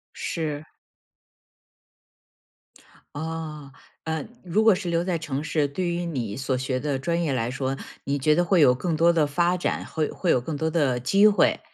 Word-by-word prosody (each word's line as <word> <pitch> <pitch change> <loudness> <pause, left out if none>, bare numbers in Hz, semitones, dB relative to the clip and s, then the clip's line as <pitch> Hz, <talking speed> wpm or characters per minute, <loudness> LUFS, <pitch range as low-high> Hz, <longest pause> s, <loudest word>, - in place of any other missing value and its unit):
是。 155 -2 -4 2.4
哦， 155 -2 -5 0.3
呃， 160 -2 -2 0.2
如 185 +5 +1
果 220 -2 +7
是 180 -2 -3
留 170 0 +1
在 180 -2 -1
城 150 -3 -4
市， 155 -1 0
对 175 +6 -3
于 175 0 -2
你 120 -10 -3
所 130 -1 -1
学 130 0 -2
的 145 -1 -1
专 170 +6 -1
业 155 -5 0
来 120 -1 -1
说， 135 0 -2 0.3
你 140 +1 0
觉 150 +3 +3
得 175 +2 +2
会 175 -1 +3
有 125 -4 +7
更 165 +5 -2
多 170 +2 +5
的 160 -3 +2
发 175 +5 +1
展， 175 - -2
会 155 -2 -2
会 175 - 0
有 - - +4
更 150 +6 -5
多 160 +2 -1
的 145 -7 +1
机 195 - +5
会。 210 - +3
155 Hz, 195 characters per minute, -25 LUFS, 135-170 Hz, 2.4 s, 果